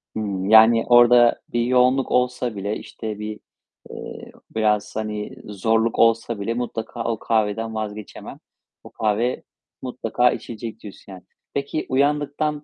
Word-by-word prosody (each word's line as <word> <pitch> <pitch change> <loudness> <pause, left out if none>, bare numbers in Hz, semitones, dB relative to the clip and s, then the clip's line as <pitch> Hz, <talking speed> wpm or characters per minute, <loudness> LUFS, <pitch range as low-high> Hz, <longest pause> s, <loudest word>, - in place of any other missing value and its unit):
Hımm. 100 -3 -3
Yani 110 +1 +7
orada 120 0 +6
bir 120 - +1
yoğunluk 125 +1 +3
olsa 125 -2 0
bile, 100 +2 -3
işte, 110 -2 -7
bir, 105 0 -6 0.5
eee, - - -9 0.2
biraz, 105 -1 0
hani, 105 +3 -4
zorluk 110 +3 0
olsa 115 -1 +2
bile 110 +3 -2
mutlaka 120 -1 -4
o 115 -1 -2
kahveden 110 0 -1
vazgeçemem. 105 -1 -7 0.5
O - - -12
kahve 110 +3 -1 0.4
mutlaka 125 -1 0
içilecek 115 -1 -7
diyorsun 100 -2 -12
yani. 95 -1 -11 0.3
Peki 140 +2 -3
uyandıktan 145 +2 0
115 Hz, 130 wpm, -22 LUFS, 105-125 Hz, 0.5 s, Yani